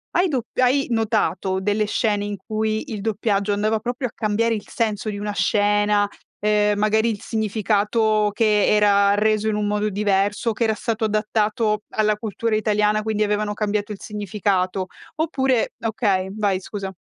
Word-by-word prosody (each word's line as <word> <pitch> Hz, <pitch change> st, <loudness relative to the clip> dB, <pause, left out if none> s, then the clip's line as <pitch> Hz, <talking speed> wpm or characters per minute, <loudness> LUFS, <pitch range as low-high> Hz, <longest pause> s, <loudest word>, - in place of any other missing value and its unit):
hai 360 Hz, +2 st, +3 dB
dop 255 Hz, -8 st, -2 dB
hai 260 Hz, +2 st, +3 dB
notato 220 Hz, -4 st, 0 dB
delle 205 Hz, +2 st, 0 dB
scene 210 Hz, -1 st, 0 dB
in 205 Hz, 0 st, -3 dB
cui 215 Hz, +5 st, -3 dB
il 205 Hz, -, -5 dB
doppiaggio 205 Hz, -1 st, 0 dB
andava 215 Hz, +2 st, +1 dB
proprio 245 Hz, +4 st, -3 dB
a -, -, -12 dB
cambiare 225 Hz, +2 st, 0 dB
il 210 Hz, -, -7 dB
senso 220 Hz, -2 st, -2 dB
di 205 Hz, -, -6 dB
una 205 Hz, 0 st, -3 dB
scena? 205 Hz, 0 st, +2 dB, 0.4 s
Ehm, 210 Hz, -1 st, +2 dB
magari 220 Hz, +2 st, +2 dB
il 205 Hz, -, -6 dB
significato 215 Hz, 0 st, +1 dB
che 210 Hz, -1 st, +3 dB
era 200 Hz, -1 st, +4 dB
reso 215 Hz, +1 st, +1 dB
in 215 Hz, -, +1 dB
un 210 Hz, 0 st, -1 dB
modo 210 Hz, 0 st, 0 dB
diverso? 205 Hz, +2 st, +1 dB
O -, -, 0 dB
che 235 Hz, -, -1 dB
era 220 Hz, -1 st, +2 dB
stato 225 Hz, +1 st, -3 dB
adattato 215 Hz, 0 st, 0 dB
alla 215 Hz, -1 st, +1 dB
cultura 220 Hz, +1 st, -2 dB
italiana, 210 Hz, 0 st, +1 dB
quindi 215 Hz, -1 st, -2 dB
avevano 210 Hz, 0 st, 0 dB
cambiato 210 Hz, 0 st, -2 dB
il 205 Hz, -, -6 dB
significato? 195 Hz, -3 st, -1 dB, 0.3 s
Oppure 270 Hz, -6 st, 0 dB
okay, 205 Hz, -4 st, 0 dB
vai 200 Hz, -3 st, 0 dB
scusa. 195 Hz, 0 st, -6 dB
210 Hz, 165 wpm, -22 LUFS, 205-220 Hz, 0.4 s, era